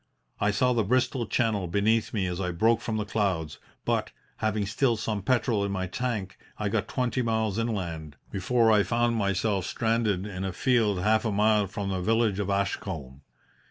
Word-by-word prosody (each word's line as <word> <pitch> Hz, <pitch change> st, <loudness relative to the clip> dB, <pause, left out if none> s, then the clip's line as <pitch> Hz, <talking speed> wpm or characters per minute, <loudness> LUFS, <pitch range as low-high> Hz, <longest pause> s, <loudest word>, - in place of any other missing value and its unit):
I 105 Hz, -, +2 dB
saw 125 Hz, +6 st, +2 dB
the 115 Hz, -2 st, +2 dB
Bristol 125 Hz, +2 st, +1 dB
Channel 105 Hz, -4 st, 0 dB
beneath 105 Hz, +5 st, +1 dB
me 100 Hz, -4 st, -1 dB
as 90 Hz, +1 st, -3 dB
I 90 Hz, -, -1 dB
broke 110 Hz, +7 st, +2 dB
from 110 Hz, -2 st, -2 dB
the 105 Hz, -, -2 dB
clouds, 95 Hz, -8 st, -1 dB, 0.3 s
but, -, -, 0 dB, 0.3 s
having 110 Hz, -1 st, 0 dB
still 115 Hz, +3 st, +1 dB
some 105 Hz, -1 st, -2 dB
petrol 110 Hz, -1 st, +1 dB
in 100 Hz, -, -1 dB
my 95 Hz, -1 st, -1 dB
tank, 100 Hz, -1 st, -3 dB, 0.2 s
I 105 Hz, -1 st, -1 dB
got 105 Hz, 0 st, -1 dB
twenty 125 Hz, 0 st, -1 dB
miles 110 Hz, -3 st, 0 dB
inland 85 Hz, -10 st, -3 dB, 0.2 s
before 115 Hz, +4 st, +2 dB
I 105 Hz, -1 st, +5 dB
found 120 Hz, +2 st, +1 dB
myself 100 Hz, -2 st, 0 dB
stranded 110 Hz, -4 st, 0 dB
in 95 Hz, -2 st, -5 dB
a 95 Hz, -1 st, -3 dB
field 110 Hz, -4 st, +2 dB
half 110 Hz, +1 st, +3 dB
a 110 Hz, -, 0 dB
mile 105 Hz, 0 st, +3 dB
from 100 Hz, +1 st, -4 dB
the 95 Hz, -1 st, -2 dB
village 110 Hz, 0 st, +1 dB
of 100 Hz, -1 st, -2 dB
Ashcombe. 80 Hz, -9 st, -3 dB
105 Hz, 185 wpm, -27 LUFS, 95-115 Hz, 0.3 s, I